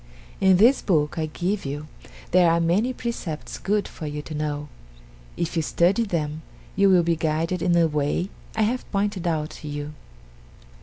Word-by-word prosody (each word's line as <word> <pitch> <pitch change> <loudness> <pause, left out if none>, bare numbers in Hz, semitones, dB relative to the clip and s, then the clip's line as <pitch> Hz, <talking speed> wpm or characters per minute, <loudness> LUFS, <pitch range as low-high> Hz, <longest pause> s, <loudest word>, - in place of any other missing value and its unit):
"In 190 -1 +5
this 235 +8 +5
book 155 -3 +1
I 155 - 0
give 185 +6 -2
you 145 +2 -5 0.4
there 180 -1 +5
are 165 0 +3
many 180 +9 +2
precepts 230 -11 -5
good 205 +1 0
for 155 - -7
you 150 0 -4
to 155 - -8
know 150 -1 -3 0.7
if 170 0 -2
you 165 - +2
study 180 +8 +2
them, 155 -5 -2 0.3
you 200 0 +4
will 180 -2 +5
be 170 0 +2
guided 160 +2 -1
in 175 - +2
the 170 -1 +4
way 150 +5 -1 0.2
I 220 - +2
have 245 +4 -2
pointed 200 -3 -1
out 155 -2 -1
to 150 - -7
you." 145 0 -5
170 Hz, 175 wpm, -24 LUFS, 150-195 Hz, 0.7 s, In